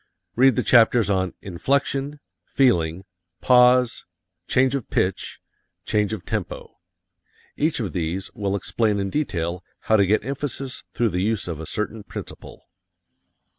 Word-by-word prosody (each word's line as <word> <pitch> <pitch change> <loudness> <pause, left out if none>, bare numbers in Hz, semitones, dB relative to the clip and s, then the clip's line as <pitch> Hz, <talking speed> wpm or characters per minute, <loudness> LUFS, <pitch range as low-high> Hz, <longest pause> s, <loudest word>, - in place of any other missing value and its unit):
Read 130 0 +5
the - - 0
chapters 115 -3 +4
on 95 -2 -1
"Inflection," 140 +8 -1 0.2
"Feeling," 90 -9 +1 0.4
"Pause," 125 -1 +4 0.4
"Change 130 0 +2
of 140 -5 -3
Pitch," 95 +1 -1 0.5
"Change 105 -1 0
of 100 -6 -5
Tempo." - - -5 0.8
Each 155 0 0
of 105 -6 -3
these 90 +1 -3
will 100 -1 -2
explain 105 +1 0
in 100 -1 -2
detail 90 - -2 0.2
how 110 - +3
to 100 -2 +3
get 105 +2 +1
emphasis 135 -1 -5
through 120 -1 +2
the 90 -1 -2
use 110 0 -1
of 85 -3 -5
a 80 - -7
certain 105 +1 -4
principle. 100 - -10
110 Hz, 135 wpm, -23 LUFS, 95-130 Hz, 0.8 s, Read